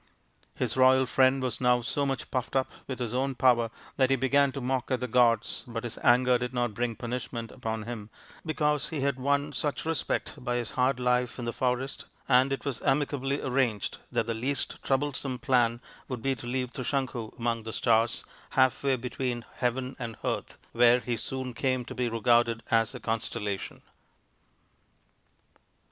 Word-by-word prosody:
His - - -1
royal 130 0 +5
friend 130 +1 +3
was 130 0 -2
now 125 -1 +4
so 140 +4 0
much 135 -2 -3
puffed 130 +1 -2
up 130 -1 +1 0.2
with 130 - -4
his 120 -2 -3
own 135 +1 0
power 120 -2 +4 0.3
that 130 -1 +4
he 135 - +4
began 135 +2 +3
to 140 - -4
mock 130 -1 -1
at 130 - +1
the 125 - -2
gods, 115 -2 +2
but 115 -1 -4
his 120 - -6
anger 125 0 +5
did 125 +1 -4
not 120 -2 0
bring 120 +1 -1
punishment 120 0 -4
upon 110 -1 -4
him 110 -2 -6 0.3
because 150 -2 0
he 155 -4 -3
had 140 -1 0
won 140 +2 +1
such 145 +3 -2
respect 165 -1 -1
by 120 -1 -1
his 120 -2 -2
hard 125 0 +1
life 125 0 +1
in 125 - -4
the 115 - -2
forest; 130 +2 -1 0.2
and 130 +1 +5
it 135 - -3
was 135 -4 -3
amicably 140 0 0
arranged 125 -5 0
that - - +1
the 115 - -1
least 130 +5 -2
troublesome 135 -1 -1
plan 120 -3 +2 0.3
would 125 -4 -5
be 135 0 +2
to 120 -1 -8
leave 125 0 -2
Trisanku 130 -4 -3
among 115 -1 -1
the 110 0 -6
stars, 115 +1 +2 0.3
half 130 0 +4
way 135 -1 +3
between 125 -1 -3
heaven 125 +1 -1
and 115 -3 -5
earth, - - -2
where 120 +1 +5
he 120 -1 -2
soon 130 +1 -4
came 130 0 0
to - - -7
be 125 -1 -1
regarded 115 0 +2
as 115 -1 +2
a - - -6
constellation. 110 -3 -3
125 Hz, 180 wpm, -28 LUFS, 120-135 Hz, 0.3 s, royal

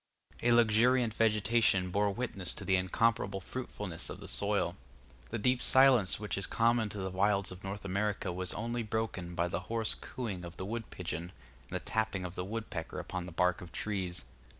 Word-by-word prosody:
A 120 - +3
luxuriant 120 +1 +4
vegetation 105 -4 +3
bore 100 +2 +2
witness 100 -5 -2
to - - -3
the 95 - +3
incomparable 95 +1 +1
fruitfulness 100 -5 -4
of - - -7
the - - -9
soil. - - +1 0.5
The 115 - -2
deep 125 +3 +2
silence 130 -9 +5
which 105 -2 -2
is 100 - 0
common 115 -1 +2
to 105 - -7
the 95 -1 -3
wilds 100 +1 +2
of 90 +1 -10
North 100 +1 -5
America 100 0 -1
was 90 +1 -2
only 120 +2 -2
broken 105 -5 -3
by 85 0 +1
the 85 - -2
hoarse 115 -1 +2
cooing 105 -8 -5
of 85 -1 -8
the 95 - -4
wood 115 +1 -4
pigeon, 85 -1 -4 0.4
and - - -5
the - - 0
tapping 110 -4 -1
of 90 - -5
the 90 - -3
woodpecker 95 -5 -5
upon 90 -1 -4
the - - -7
bark 90 +1 +1
of 90 -2 -9
trees. 95 -3 -2
100 Hz, 190 wpm, -32 LUFS, 90-115 Hz, 0.5 s, silence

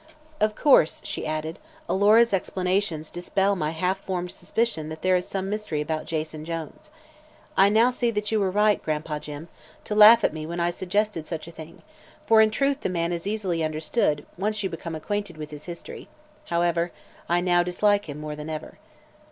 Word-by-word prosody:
"Of 215 0 +1
course," 270 - +4
she - - -4
added, 155 +1 -3 0.3
"Alora's 215 +4 +4
explanations 180 -3 -1
dispel 195 +3 0
my 155 -5 -1
half 180 +4 -1
formed 180 -2 -4
suspicion 225 -10 -2
that 155 0 -8
there 185 0 +4
is 180 - -1
some 195 -1 -3
mystery 210 -6 -3
about 155 +1 -3
Jason 155 -1 -3
Jones. 165 - -6 0.7
I 195 +1 +6
now 225 +4 +4
see 245 -1 0
that 210 -1 -2
you 220 - +2
were 195 -2 +1
right, 210 +2 +3
Gran'pa 155 -1 -3
Jim, 150 +2 -8 0.4
to - - -4
laugh 215 +2 +8
at - - +2
me 155 -1 -5
when 170 +1 -4
I 170 0 +1
suggested 185 -2 -1
such 160 -2 -5
a - - -9
thing, 160 0 -12 0.4
for 225 -4 +6
in 220 - +5
truth 275 +5 0
the - - -1
man 170 -1 -1
is 170 +2 -4
easily 190 -6 -1
understood 155 0 0
once 210 +1 -1
you 190 - -2
become 165 0 -6
acquainted 200 +1 -4
with 155 0 -7
his 150 0 -9
history. 170 -1 -8 0.4
However, 170 0 0 0.4
I 175 +1 +3
now 175 0 +3
dislike 200 +2 +1
him 145 +1 -6
more 150 0 -5
than 150 +1 -7
ever." 155 -1 -7
175 Hz, 190 wpm, -25 LUFS, 160-205 Hz, 0.7 s, laugh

